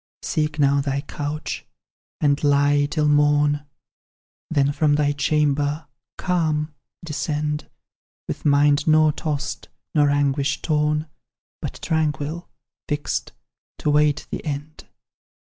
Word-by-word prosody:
"Seek 150 -1 -1
now 140 -1 +3
thy 140 0 -1
couch, 145 +1 -4 0.6
and 145 -1 +2
lie 145 0 +3
till 150 0 0
morn, 145 0 +3 0.8
Then 140 -3 +2
from 145 0 +2
thy 145 -1 +2
chamber, 145 +1 +1 0.3
calm, 155 -4 0 0.3
descend, 150 -1 -2 0.6
With - - -5
mind 145 0 +4
nor 155 0 +5
tossed, 145 -3 -4 0.2
nor 145 -2 +4
anguish 140 0 +1
torn, 150 0 +1 0.5
But - - -5
tranquil, 155 +1 -1 0.4
fixed, 145 0 -2 0.4
to 150 - 0
wait 150 0 +3
the - - -4
end. 150 0 -6
150 Hz, 110 wpm, -23 LUFS, 145-150 Hz, 0.8 s, nor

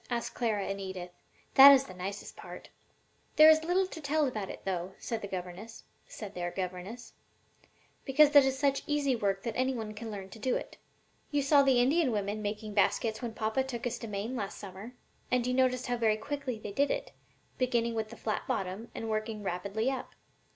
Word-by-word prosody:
asked 240 -1 -2
Clara 215 -5 -1
and 195 0 -4
Edith. 185 -2 -6 0.4
"That 275 +1 +11
is 275 -1 +6
the 185 - -11
nicest 190 +3 -6
part." - - -10 0.7
"There 310 +1 +9
is 315 0 +3
little 360 +3 +2
to 335 -3 -9
tell 300 +1 +1
about 215 -7 -3
it, - - -8
though," 185 -1 -3
said 230 -2 -4
their 200 - -6
governess, 185 +4 -7 2.2
"because 295 +2 +4
it 285 - +10
is 265 0 0
such 275 0 +1
easy 290 -3 +1
work 200 -3 -1
that 230 - -3
any 260 +1 +1
one 220 -2 -5
can 225 +2 -7
learn 195 -2 -7
to 225 - -11
do 255 +3 0
it. - - -5 0.5
You 290 -1 +1
saw 280 +1 +6
the 265 -3 +4
Indian 275 +3 +3
women 205 0 -2
making 210 +1 -4
baskets 220 +2 +1
when 235 -2 -5
papa 220 +4 0
took 250 -3 -5
us 240 0 -2
to 230 - -6
Maine 210 +4 -4
last 200 -5 -4
summer, 200 +5 -9 0.4
and 250 -1 +1
you 250 - 0
noticed 255 0 +2
how 245 0 -1
very 220 -2 +2
quickly 275 -1 -4
they 210 -1 -7
did 280 +7 +1
it, - - -3 0.5
beginning 240 -2 +1
with 220 -1 -2
the 235 - -11
flat 215 - -3
bottom 195 +4 -3
and 225 - -4
working 215 -1 -3
rapidly 200 +6 -1
up. 265 - -6
230 Hz, 195 wpm, -30 LUFS, 205-265 Hz, 2.2 s, That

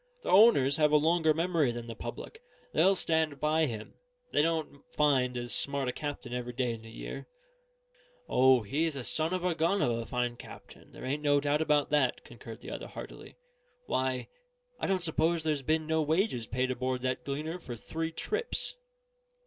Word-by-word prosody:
The - - -2
owners 180 - +6
have 150 -1 +3
a 150 - +6
longer 160 +1 +3
memory 165 -4 +1
than 120 0 -6
the 115 - -6
public; 120 - -8 0.3
they'll 195 +1 +4
stand 160 -5 +1
by 155 +1 +2
him; 110 -3 -6 0.4
they - - +3
don't 160 -3 -1
find 130 -4 +2
as 120 0 -2
smart 140 -1 0
a - - +1
captain 145 -3 -5
every 125 0 -4
day 125 -1 -1
in 115 - -8
the 115 - -12
year." 115 - -7 1.0
"O, 130 -2 +5
he's 150 +8 -1
a 135 - -4
son 160 +6 0
of 185 -1 -2
a 180 - +2
gun 170 +5 +1
of 125 - +2
a 115 0 -3
fine 125 -1 -2
captain; - - -13
there - - -9
ain't 140 +3 -2
no 145 -1 +3
doubt 145 +1 +1
of 150 -2 +2
that," 145 -4 +2
concurred - - -11
the - - -8
other, - - -6
heartily. - - -10 0.5
"Why, 130 - -1 0.5
I - - -1
don't 190 -2 0
suppose 160 0 +2
there's 155 -3 0
been 155 +3 0
no 160 0 +1
wages 155 - 0
paid 130 +1 -1
aboard 130 0 -2
that 130 -1 -1
Gleaner 155 +6 -4
for 125 -8 -7
three 160 +7 -4
trips." 460 - -2
145 Hz, 190 wpm, -30 LUFS, 125-160 Hz, 1.0 s, owners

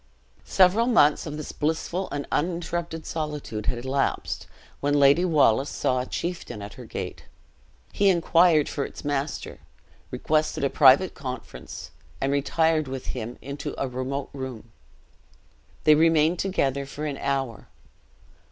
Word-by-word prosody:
Several 195 +6 +4
months 155 -12 +4
of 150 0 -5
this 155 - -6
blissful 160 +4 -2
and 145 -1 -4
uninterrupted 170 0 -2
solitude 150 -9 -4
had 120 0 -2
elapsed, 135 +1 -1 0.3
when 145 +1 +1
Lady 140 +5 +5
Wallace 145 -6 +3
saw 130 -1 0
a 125 - -3
chieftain 170 -10 -4
at 100 0 -8
her - - -10
gate. - - -6 0.7
He 200 -1 +3
inquired 170 -3 +4
for 140 - -2
its - - -8
master 145 +1 -3 0.5
requested 155 -2 0
a 140 - +1
private 145 +6 +6
conference 130 -3 -8 0.3
and 135 - 0
retired 155 +2 +1
with 130 -1 -5
him 120 -1 -6
into 140 +1 -5
a 135 - 0
remote 130 +2 -4
room. 130 -5 -7 1.1
They 155 - +7
remained 160 +1 +4
together 140 -8 0
for 150 +2 -6
an 145 -2 -3
hour. 135 -4 -2
145 Hz, 135 wpm, -25 LUFS, 135-165 Hz, 1.1 s, They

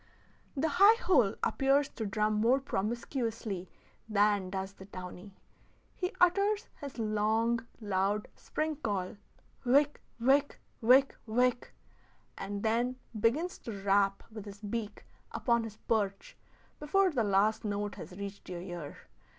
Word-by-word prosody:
The 300 +4 +2
high 430 +4 +8
hole 245 - +4
appears 275 +1 +3
to 220 - -4
drum 210 +2 +1
more 230 +5 +3
promiscuously 225 -4 -3 0.4
than 205 -2 +2
does 190 0 -4
the 190 - -12
downy. 185 0 -9 0.6
He 360 +1 -2
utters 400 +4 +3
his 280 -3 -7
long, 225 +2 +1
loud 205 0 0
spring 310 -1 -3
call, 205 -8 -3 0.5
whick 285 +4 +3 0.2
whick 275 +4 +3 0.2
whick 260 +4 +5
whick, 245 +2 +1 0.6
and 200 +1 -5
then 235 +3 +1 0.2
begins 295 - +1
to 205 -4 -7
rap 195 0 +2
with 215 -2 -8
his 200 -1 -9
beak 210 0 -4 0.3
upon 235 -2 +1
his 215 -1 -9
perch 205 -3 -1 0.4
before 370 +6 +3
the 250 -6 +1
last 205 +2 +2
note 205 -1 -2
has - - -9
reached 200 -1 -7
your 175 -1 -5
ear. 175 -5 -7
220 Hz, 130 wpm, -31 LUFS, 200-265 Hz, 0.6 s, high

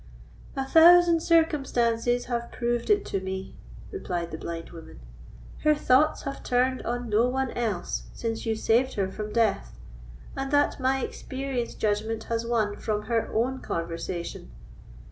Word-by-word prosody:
"A 270 -1 -1
thousand 335 +2 +7
circumstances 245 -8 +2
have 235 -1 -3
proved 240 -1 -2
it 415 -1 +3
to 195 - -2
me," 190 0 -5 0.4
replied 175 - -4
the 160 - -5
blind 165 -1 -6
woman. 165 - -12 0.6
"Her 305 0 +3
thoughts 295 +2 +3
have 275 -1 -5
turned 255 +1 +1
on 245 +1 -3
no 225 +2 +3
one 265 0 -1
else 215 -7 -2
since 225 -1 -4
you 225 -1 0
saved 235 +4 +2
her 190 -2 -1
from 210 +1 -5
death, 225 -2 0 0.6
and 270 0 -3
that 290 0 +2
my 265 0 +1
experienced 260 -2 -4
judgment 220 +1 -1
has 230 0 -2
won 215 -3 0
from 210 -1 -2
her 230 -2 -1
own 255 +4 0
conversation. 170 +1 -5
235 Hz, 145 wpm, -26 LUFS, 210-265 Hz, 0.6 s, thousand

